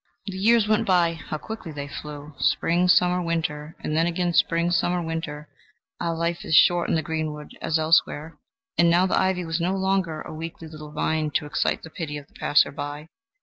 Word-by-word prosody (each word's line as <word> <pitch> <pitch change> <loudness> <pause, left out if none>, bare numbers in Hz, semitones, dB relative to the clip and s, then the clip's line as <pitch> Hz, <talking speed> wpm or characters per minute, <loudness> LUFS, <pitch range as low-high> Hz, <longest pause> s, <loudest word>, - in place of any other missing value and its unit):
The 195 -3 -5
years 220 +3 +4
went 215 0 +2
by; 175 -3 +3
how 155 -1 -6
quickly 220 -1 -7
they 145 -1 -6
flew, 150 +1 -8
spring, 175 +2 +2
summer, 180 0 +4
winter, 160 -2 -3
and 155 - -2
then 165 +1 +3
again 175 0 -1
spring, 170 +1 +2
summer, 175 0 +1
winter, 160 -3 -4 0.5
ah, 170 - -1
life 170 +1 -2
is 160 - +1
short 175 +1 +5
in - - +2
the 160 - 0
greenwood 155 -1 -4
as 160 - +1
elsewhere! 155 -1 +1 0.4
And 170 0 +6
now 175 +2 +4
the 190 - +1
ivy 185 -2 +1
was 165 +1 -2
no 185 +3 0
longer 190 -4 0
a - - -8
weakly 165 +1 -7
little 155 -1 -10
vine 155 0 0
to - - +1
excite 145 - -1
the 160 - -10
pity 155 -5 -5
of 145 - -9
the - - -32
passer 145 - +3
by. 145 +2 -6
165 Hz, 200 wpm, -24 LUFS, 155-175 Hz, 0.5 s, And